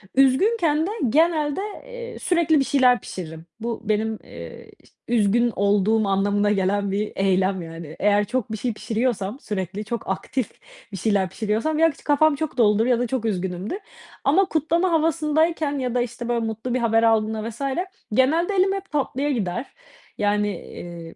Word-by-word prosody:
Üzgünken 305 - +3
de - - -3 0.2
genelde, 310 - +2 0.2
eee, 485 -1 -8
sürekli 335 -4 +2
bir - - +3
şeyler 250 -3 +4
pişiririm. 160 -3 -8
Bu 230 0 -4
benim, 220 +1 0
eee, - - -11
iş - - -24 0.2
üzgün 235 +1 +2
olduğum 205 +2 +2
anlamına 205 +1 +2
gelen 200 0 +1
bir 210 +2 -1
eylem 190 -1 +1
yani. 165 -1 -8
Eğer 205 0 +3
çok 230 0 -2
bir 220 - -2
şey 240 +2 -2
pişiriyorsam 220 0 -2
sürekli, 200 - -4
çok 235 0 -4
aktif 225 +5 -2 0.4
bir 195 - -5
şeyler 195 -1 +1
pişiriyorsam 220 - -1
ya, 325 0 +5
ç 280 - -18
kafam 295 0 +4
çok 315 -1 -4
doludur 220 -1 +4
ya 245 -2 +2
da 245 - 0
çok 245 -1 -2
üzgünümdür 190 - -2 0.5
ama 350 +8 +4
kutlama 335 +2 +1
havasındayken 315 -2 +1
ya 250 -2 -2
da, 245 - +3
işte, 240 0 -5
böyle, 235 -1 0
mutlu 225 +3 -3
bir 255 - +1
haber 225 -1 +2
aldığımda 220 0 +1
vs. 235 +3 -11 0.5
genelde 320 - +3
elim 385 +1 +3
hep 390 0 -6
tatlıya 285 0 -1
gider, 230 0 -2 0.5
yani, 205 0 +1
eee, 170 -1 -9
230 Hz, 165 wpm, -23 LUFS, 205-295 Hz, 0.5 s, ya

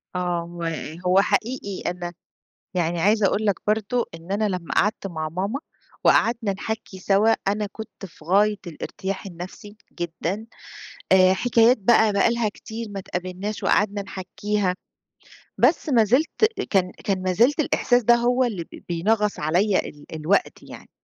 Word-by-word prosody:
آه، 175 -1 -1 0.2
و - - -4 0.4
هو 185 +2 +5
حقيقي 215 -3 -1
أنا 175 -1 -6 0.6
يعني 170 -1 0
عايزة 210 +1 +4
أقول 210 +3 0
لك 200 - +3
برضو 220 +3 +1
إن 165 +4 -8
أنا 210 +1 +1
لمّا 180 -3 -4
قعدت 210 -1 +1
مع 160 -4 -4
ماما 195 - -3 0.4
وقعدنا 230 -3 +3
نحكّي 210 -1 -5
سوا 200 +4 +3 0.2
أنا 205 +1 0
كنت 220 -2 -9
في 155 -2 -18
غاية 205 +4 +3
الارتياح 190 +4 -5
النفسي 190 +4 -9 0.2
جدًا 175 +5 -3 0.7
آآ، 185 0 +6
حكايات 235 +2 +4
بقى 220 0 +4
بقى 200 +3 +3
لها 235 -2 0
كتير 220 +2 -7
ما 200 - -5
اتقابلناش 185 +3 -5
وقعدنا 205 -1 +2
نحكّيها، 190 0 -2 0.8
بس - - +3
ما 235 -5 +5
زلت 275 - +2 0.3
كان 185 -3 +2
كان 190 -2 0
ما 185 0 0
زلت 255 - +3
الإحساس 245 -4 +2
ده 240 +2 +6
هو 245 +2 +2
اللي 195 -8 -2
بي - - -14
بينغص 210 +5 +1
عليّا 180 +6 +1
ال 145 0 -13
الوقت 160 +6 0
يعني - - -12
200 Hz, 150 wpm, -23 LUFS, 180-220 Hz, 0.8 s, آآ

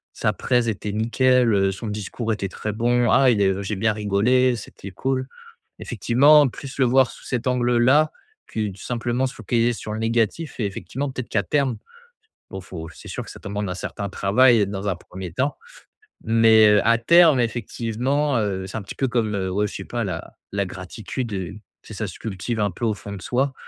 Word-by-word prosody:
sa - - 0
présentation 120 -2 +1
était 105 -1 -3
nickel, 120 +2 +2
heu, 95 -1 +2
son 100 +4 -6
discours 105 +2 -3
était 100 -2 -3
très 105 - -4
bon, 120 +2 +2
ah 135 -2 +5
il 105 -4 +1
est 100 - +4
heu, 95 +1 0
j'ai 105 +2 -3
bien 110 +3 +1
rigolé, 110 +5 +2
c'était 100 -3 -9
cool». 130 +5 -2 0.5
Effectivement, 145 +4 +4
plus 135 +2 -8
le 130 - +5
voir 130 +1 +4
sous - - -15
cet 125 -1 -3
angle-là, 125 +4 +3 0.4
que 110 -1 -2
tout 95 0 -11
simplement 120 +1 -1
se 130 - -4
focaliser 115 +2 0
sur 110 -1 -6
le 110 - -4
négatif 115 +8 -1
et 110 - 0
effectivement, 135 +8 -5
peut-être 130 -2 -6
qu'à 100 - +1
terme 140 -6 0 0.7
bon, 95 - -6
faut 90 -3 -8
c'est - - -13
sûr - - -5
que - - -11
ça - - -10
demande 100 0 -4
un - - -3
certain 100 +2 -5
travail, 115 +5 +4
heu, - - +1
dans 100 +1 -4
un 95 - 0
1er 90 0 -9
temps. 130 - -1 0.7
Mais, 110 -1 +5
heu, 105 -1 +5
à 115 0 +5
terme, 165 +2 +6
effectivement, 120 +4 -1
heu, 95 -3 -2
c'est 95 - -6
un - - -4
petit 100 - -9
peu 135 - 0
comme, 110 -4 0
heu, 95 -1 -2
ouais, 105 +3 0
je - - -10
sais 95 - -5
pas 120 -1 -3
la 90 -4 -5 0.2
la 100 0 0
gratitude, 100 +6 -6
heu, 95 -1 -4 0.3
c'est - - -11
ça 105 +2 -3
se 90 - -10
cultive 110 +2 -4
un 105 -1 +1
peu 115 - -4
au 110 - +1
fond 100 0 -9
de 100 - -8
soi, 135 +7 0
115 Hz, 215 wpm, -23 LUFS, 100-125 Hz, 0.7 s, terme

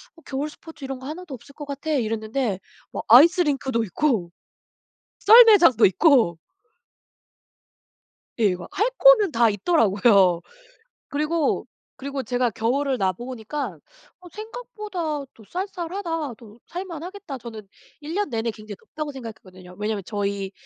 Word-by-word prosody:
"어 330 - -18
겨울 285 +3 -3
스포츠 320 -1 -14
이런 265 -1 -5
거 260 - -11
하나도 320 0 -7
없을 280 +4 -16
것 295 +1 -9
같아." 285 +2 -5
이랬는데 225 -4 -1 0.3
막 - - -5
아이스링크도 275 - +5
있고 215 - -1 0.9
썰매장도 415 - +7
있고 225 - +3 2.0
예 230 - 0
이거 180 -3 0
막 - - -11
할 430 +5 +2
거는 - - +6
다 230 -3 +3
있더라고요. 200 - +3 0.7
그리고, 305 +1 -1 0.3
그리고 275 0 -5
제가 245 +1 0
겨울을 255 +5 -1
나 190 -1 +1
보니까 240 - -6 0.4
'어 360 - -13
생각보다 425 - -5
또 220 - -17
쌀쌀하다. 345 - -4
또 220 0 -16
살 360 +2 -6
만하겠다.' 355 -3 -8
저는 225 -3 -10 0.3
'1 305 +2 -7
년 410 +1 0
내내 230 -1 -1
굉장히 215 -1 -10
덥다.'고 300 +8 -7
생각했거든요. 185 -7 -11
왜냐하면 210 -1 -2
저희 200 -2 -3
270 Hz, 300 characters per minute, -23 LUFS, 215-330 Hz, 2.0 s, 썰매장도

